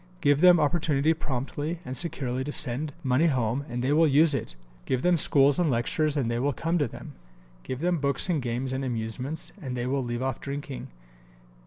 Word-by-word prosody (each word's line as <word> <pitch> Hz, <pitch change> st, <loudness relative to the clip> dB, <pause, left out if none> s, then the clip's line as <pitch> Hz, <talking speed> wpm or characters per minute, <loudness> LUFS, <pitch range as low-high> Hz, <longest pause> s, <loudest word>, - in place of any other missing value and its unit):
Give 145 Hz, -1 st, +3 dB
them 180 Hz, -2 st, +7 dB
opportunity 150 Hz, -1 st, +2 dB
promptly 145 Hz, +2 st, -4 dB
and 130 Hz, 0 st, -5 dB
securely 130 Hz, -5 st, -2 dB
to 145 Hz, -, -3 dB
send 145 Hz, +3 st, 0 dB
money 135 Hz, +5 st, +3 dB
home 130 Hz, -1 st, 0 dB
and 120 Hz, 0 st, -3 dB
they 135 Hz, +3 st, +2 dB
will 160 Hz, +1 st, +5 dB
use 150 Hz, +2 st, +4 dB
it. 110 Hz, -, -3 dB, 0.3 s
Give 130 Hz, -1 st, -1 dB
them 180 Hz, 0 st, +4 dB
schools 145 Hz, -1 st, +3 dB
and 175 Hz, -3 st, +2 dB
lectures 145 Hz, +5 st, 0 dB
and 130 Hz, -5 st, 0 dB
they 120 Hz, 0 st, -1 dB
will 140 Hz, +3 st, 0 dB
come 165 Hz, +6 st, -1 dB
to 145 Hz, -, +1 dB
them. -, -, -10 dB, 0.5 s
Give 130 Hz, -, -6 dB
them 175 Hz, -1 st, +1 dB
books 140 Hz, +2 st, +2 dB
and 165 Hz, -6 st, 0 dB
games 125 Hz, +2 st, -3 dB
and 135 Hz, +1 st, -2 dB
amusements 125 Hz, +5 st, -3 dB
and 130 Hz, -4 st, -5 dB
they 120 Hz, -, -2 dB
will 135 Hz, +1 st, -1 dB
leave 120 Hz, +1 st, -3 dB
off 130 Hz, -2 st, -3 dB
drinking. 140 Hz, -1 st, -6 dB
140 Hz, 200 wpm, -27 LUFS, 125-155 Hz, 0.5 s, them